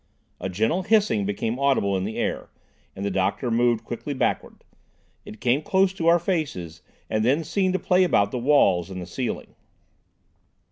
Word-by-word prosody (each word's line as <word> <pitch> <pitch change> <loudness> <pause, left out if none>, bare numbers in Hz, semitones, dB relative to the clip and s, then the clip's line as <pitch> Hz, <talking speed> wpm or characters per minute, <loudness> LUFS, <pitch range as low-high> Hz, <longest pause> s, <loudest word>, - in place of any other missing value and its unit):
A 95 - -4
gentle 110 - 0
hissing 200 - +2
became 110 +4 -2
audible 135 -8 +2
in 95 0 -1
the 110 - -5
air, - - -2 0.5
and 100 - -5
the 100 - -1
doctor 95 +6 -1
moved 120 0 +2
quickly 140 +4 -5
backwards. - - -2 0.6
It 105 - -11
came 125 +4 +1
close 190 +3 +2
to 165 -4 -2
our 170 +1 +6
faces 140 - -3 0.3
and 110 0 0
then 140 +8 +2
seemed 185 +3 0
to 185 - 0
play 185 0 +3
about 100 - +2
the 125 - -3
walls 100 - +3
and 90 -1 -7
ceiling. 125 +8 -4
120 Hz, 170 wpm, -24 LUFS, 100-165 Hz, 0.6 s, our